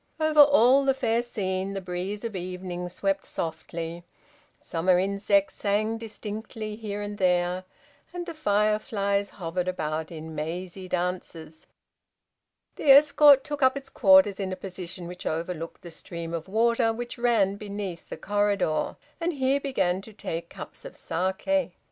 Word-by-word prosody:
Over 310 -1 +2
all 280 -2 +7
the 270 -1 +2
fair 235 -3 +1
scene 195 -4 -3
the - - -1
breeze 185 +3 -4
of 230 -3 -4
evening 180 -1 -5
swept 195 +2 -1
softly, 165 +1 -5 0.6
summer 175 +2 +1
insects 200 +1 +1
sang 215 +2 0
distinctly 215 -1 -6
here 205 -2 -5
and 205 0 -6
there, 180 0 +1 0.5
and 350 -1 -5
the 340 - -6
fireflies 205 -5 +1
hovered 180 -1 -4
about 160 -3 -2
in 160 -1 -8
mazy 175 +4 -5
dances. 175 -3 -4 1.1
The 290 - -1
escort 285 0 +8
took 290 -1 -5
up 260 +1 +4
its 275 -1 -8
quarters 285 -9 +5
in 190 -1 -2
a - - -2
position 180 -2 -7
which 180 +1 -7
overlooked 165 0 -4
the 170 - -9
stream 165 0 -6
of 165 0 -4
water 230 +2 +3
which 240 +2 -6
ran 215 -5 +2
beneath 200 -4 -6
the - - -6
corridor, 205 -5 0 0.2
and 340 +1 -1
here 270 0 +1
began 190 -10 0
to 220 +2 -13
take 170 -4 -5
cups - - -10
of - - -9
saké. 190 - -1
200 Hz, 150 wpm, -26 LUFS, 180-230 Hz, 1.1 s, escort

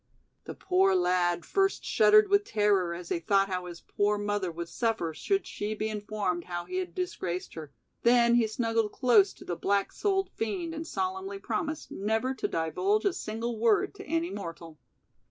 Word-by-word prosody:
The - - -7
poor 380 +1 +2
lad 180 - +1
first 390 0 0
shuddered 425 0 +5
with 405 +1 +3
terror 205 - +1
as 175 0 -9
he - - 0
thought 195 +3 +2
how 180 -1 -3
his 170 -1 -9
poor 205 +1 0
mother 205 -3 -1
would 170 +1 -6
suffer 220 -7 -1
should 390 - -1
she 210 +1 -4
be 215 +1 -2
informed 205 -4 -3
how 175 -1 -4
he 370 - -4
had 370 -1 -4
disgraced 185 - -3
her, 155 -3 -8 0.3
then 235 0 +5
he 235 -2 +4
snuggled 225 -1 -1
close 225 -7 +4
to - - -14
the 175 - -3
black 200 +3 0
souled 390 -2 0
fiend 325 - -3
and 320 0 -6
solemnly 380 +2 -3
promised 315 -5 -4
never 220 +6 -1
to - - -2
divulge 380 - 0
a 395 - +2
single 225 -1 -4
word 225 -2 +2
to - - -10
any 330 +3 -1
mortal. 165 -5 -8
220 Hz, 180 wpm, -29 LUFS, -, 0.3 s, shuddered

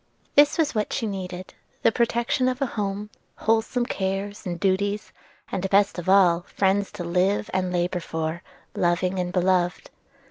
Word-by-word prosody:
This 290 +3 +5
was 315 -3 +1
what 215 -2 -1
she 240 - -1
needed, 185 -3 -5 0.3
the - - +5
protection 235 +3 +1
of 255 0 -1
a 275 - +1
home, 205 -3 -3 0.2
wholesome 225 +2 +1
cares 195 0 -3
and 175 -1 -4
duties; 200 +2 0 0.4
and, 190 0 -2
best 200 -1 +3
of 175 - -4
all, 180 -3 +5
friends 195 +1 +1
to 175 - -5
live 185 +5 +1
and 185 -1 0
labor 180 0 0
for, 160 0 -3 0.3
loving 180 +2 +1
and 180 0 -2
beloved. 180 -1 +1
195 Hz, 155 wpm, -25 LUFS, 180-210 Hz, 0.4 s, This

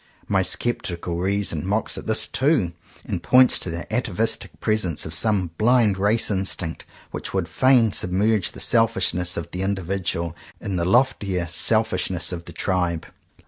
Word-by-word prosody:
My 95 -2 +2
sceptical 90 -5 -1
reason 95 -4 -1
mocks 105 +4 -1
at - - -7
this 110 0 +3
too, 130 - +1 0.3
and 85 - -4
points 125 +9 +5
to - - -2
the 85 +1 -5
atavistic 115 -2 -1
presence 105 -8 -1
of 80 - -4
some 95 -1 +1
blind 115 -2 +3
race 105 +3 +2
instinct 95 -4 -2 0.3
which - - -5
would 95 -3 0
fain 120 +4 +3
submerge 100 +3 +1
the - - -10
selfishness 90 0 +1
of 85 - -5
the 90 - -4
individual 95 -3 -2 0.2
in 100 - -4
the 85 -1 -1
loftier 95 -4 +1
selfishness 95 -3 +1
of 85 -1 -6
the - - -10
tribe. 90 -2 -1
95 Hz, 150 wpm, -23 LUFS, 85-110 Hz, 0.3 s, points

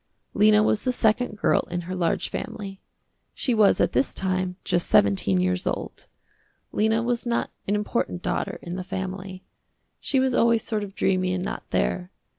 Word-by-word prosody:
Lena 210 +1 +5
was 215 - +2
the 255 - 0
second 225 -2 +1
girl - - +3
in 175 0 -2
her 180 +2 -6
large 180 -2 0
family. 195 -2 -6 0.5
She 255 - 0
was 215 -3 +4
at - - +2
this 275 - 0
time 185 -1 -1
just 175 -2 +1
seventeen 100 -2 +3
years 90 0 0
old. - - -4 0.6
Lena 220 +2 +1
was 240 0 -1
not 235 0 0 0.2
an 205 - +2
important 210 -3 -2
daughter - - -2
in 175 +1 -5
the 185 - -4
family. 190 0 -5 0.6
She 270 - +1
was 260 -1 +2
always 235 -2 +3
sort 215 -2 -2
of 195 -1 -8
dreamy 185 -1 +1
and 180 0 -2
not - - -6
there. 180 0 0
195 Hz, 175 wpm, -25 LUFS, 185-220 Hz, 0.6 s, Lena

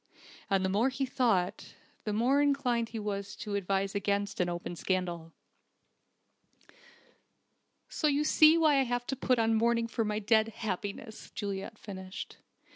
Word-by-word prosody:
And 195 -1 +2
the - - +1
more 215 +7 +2
he 270 +1 -2
thought, 225 -9 0 0.3
the 210 - -1
more 250 +7 +3
inclined 255 -5 +1
he 225 - -6
was 200 -1 -4
to 210 - -6
advise 195 0 0
against 200 0 -1
an 180 -1 +1
open 175 0 -5
scandal. 175 -2 -2 2.6
"So 310 - 0
you 290 0 +2
see 310 +1 +6
why 310 -3 +4
I - - +4
wanted 245 -1 -2
to 270 - 0
put 255 -1 +1
on 225 0 +2
mourning 230 +1 +2
for 230 0 -1
my 210 -1 -1
dead 220 +1 +3
happiness," 215 0 -5
Juliet 200 +1 -4
finished. 190 -2 -8
215 Hz, 150 wpm, -30 LUFS, 195-245 Hz, 2.6 s, see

